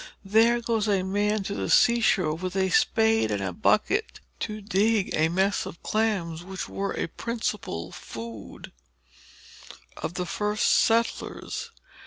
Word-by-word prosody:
There 225 +4 +4
goes 225 -2 0
a 195 -3 +2
man 205 +2 0
to 200 - -4
the - - -3
sea 235 0 +5
shore, 180 -8 +2
with 185 +3 -5
a 190 -1 +1
spade 220 - +3
and 105 -1 -1
a 95 -1 -3
bucket, 400 - +1 0.2
to 215 -1 -4
dig 210 0 +1
a 160 +1 +2
mess 190 +4 +1
of 165 - -10
clams, 190 -7 -1
which 190 0 -6
were 200 0 -3
a - - 0
principal 210 - -4
article - - -12
of - - -12
food 115 -2 -9 1.3
with 160 - -3
the 180 - -2
first 210 +4 0
settlers. 230 - 0
200 Hz, 155 wpm, -26 LUFS, 175-220 Hz, 1.3 s, sea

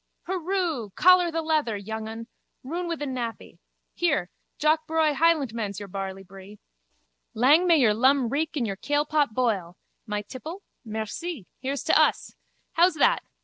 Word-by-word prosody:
Hurroo! 355 - -2
Collar 365 -1 +6
the 330 0 -2
leather, 305 -9 0
youngun. 220 +2 -6 0.4
Roun 340 +7 -4
wi 335 - -1
the 295 - -5
nappy. 245 -4 -5 0.3
Here, 300 - 0 0.3
Jock 310 +1 +2
braw 315 -1 +2
Hielentman's 260 - +1
your 205 -1 -8
barleybree. 195 +1 -8 0.8
Lang 290 +10 +5
may 335 -2 +6
your 235 -7 +4
lum 260 +2 +3
reek 310 +5 -2
and 260 -5 0
your 195 -3 -4
kailpot 290 -2 0
boil! 200 -8 -1 0.3
My 210 0 -2
tipple. 320 - -8 0.2
Merci. 220 - -5
Here's 275 +2 -3
to - - +2
us. - - +1 0.4
How's 345 +1 +3
that? 475 +11 +3
275 Hz, 145 wpm, -26 LUFS, 215-320 Hz, 0.8 s, Collar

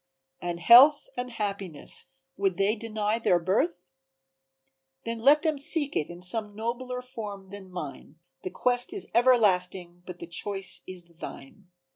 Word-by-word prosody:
"And 175 -1 -4
Health 255 - +7
and 250 0 -4
Happiness, 200 -8 -4 0.3
would 195 -3 -1
they 200 +3 +2
deny 215 0 -2
their 185 -6 +3
birth? 175 0 -1 1.2
Then 230 0 -4
let 285 +6 +5
them 310 -3 0
seek 285 0 +3
it 150 - -1
in 175 +1 -10
some 210 +2 -1
nobler 250 +3 -4
form 205 -6 -8
than 200 -2 -10
mine, 150 -4 -8 0.3
The - - -5
quest 245 - +1
is 405 - -2
everlasting 185 -7 +2
but 180 -1 -8
the 170 - -8
choice 195 +3 -2
is 185 -1 -7
thine." 170 +1 -11
205 Hz, 145 wpm, -27 LUFS, 180-240 Hz, 1.2 s, Health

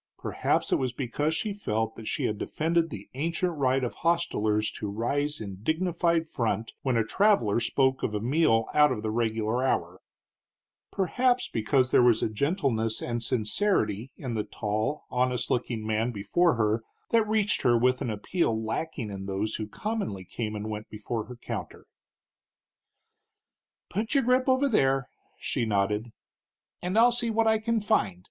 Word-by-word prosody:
Perhaps - - -1
it - - +4
was 130 -2 -2
because 145 +5 -1
she 210 +4 -2
felt 110 - -2
that 110 - -9
she - - -1
had 105 -1 -1
defended 165 +1 0
the 105 -7 -8
ancient 170 +5 -1
right 135 -2 +1
of 120 - -2
hostelers 110 -11 +1
to 105 - -5
rise 145 +8 -1
in 100 -3 -7
dignified 170 - +1
front 115 -6 -2
when 130 -3 +1
a 115 - +3
traveler 155 - +3
spoke 130 +3 +1
of 105 - -1
a - - 0
meal 115 -2 +2
out 150 -1 +5
of 110 -4 -3
the 110 - -1
regular 115 +1 0
hour, 90 -8 -1 0.9
perhaps 245 +6 +1
because 125 +4 +1
there - - +6
was 120 -2 +4
a - - +1
gentleness 115 - 0
and 120 -1 -3
sincerity 115 - 0
in 125 -3 -4
the 110 -2 -1
tall, 110 +9 -2
honest 125 -1 0
looking 120 -3 -1
man 110 +2 0
before 120 - +2
her 110 0 +1 0.3
that 225 -2 +3
reached 210 -2 +1
her 120 -1 +4
with 125 +2 +2
an - - -2
appeal 110 - 0
lacking 110 0 -3
in 95 -1 -6
those 100 +3 -2
who 110 - -4
commonly 195 - -4
came 105 +3 -4
and 105 +1 -4
went 105 0 -6
before 110 +1 -4
her 125 - -9
counter. 120 - -7 2.0
"Put 220 +7 -2
your 275 - +4
grip 255 +2 +2
over 260 +2 +4
there," 135 - +2 0.3
she - - -2
nodded, 105 +1 0 0.7
"and 180 +4 -1
I'll 240 +2 +7
see 240 -1 0
what 225 0 +2
I 220 0 +3
can 230 +1 0
find. 200 - +1
125 Hz, 165 wpm, -27 LUFS, 110-170 Hz, 2.0 s, I'll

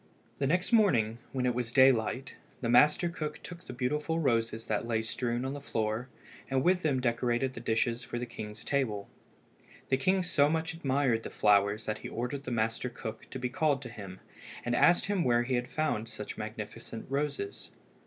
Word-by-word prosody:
The 135 - +1
next 180 - +1
morning, 120 - +4
when 130 -1 -1
it 125 - +2
was 120 -1 -2
daylight, 130 0 +4 0.3
the 115 - -2
master 150 +8 +5
cook 155 -3 -4
took 175 0 -9
the - - -5
beautiful 150 +6 -1
roses 115 -6 +1
that 110 +2 -1
lay 110 -1 0
strewn 120 +2 -2
on 135 - -2
the 145 - -6
floor 110 -1 -2 0.4
and 135 -1 +1
with 180 0 +3
them 145 -6 +1
decorated 120 +1 0
the 120 - -7
dishes 115 +1 0
for 120 - -5
the 120 - -2
king's 110 -2 -8
table. 110 -8 0 0.8
The 130 - +3
king 185 +7 +2
so 145 -4 +3
much 160 +1 -1
admired 135 -6 +1
the - - -6
flowers 105 +1 +3
that 110 0 -2
he - - -7
ordered 130 +4 -4
the - - -3
master 115 +1 0
cook 115 -2 -7
to - - -5
be 125 -1 -2
called 145 0 +1
to 125 - -6
him, 100 -5 -9 0.5
and 120 0 +1
asked 175 +7 +5
him 200 -3 +1
where 120 -1 +3
he 130 +2 -2
had 125 0 0
found 135 -8 -1
such 105 -2 -7
magnificent 110 +1 -6
roses. 140 -7 -3
125 Hz, 195 wpm, -31 LUFS, 115-145 Hz, 0.8 s, master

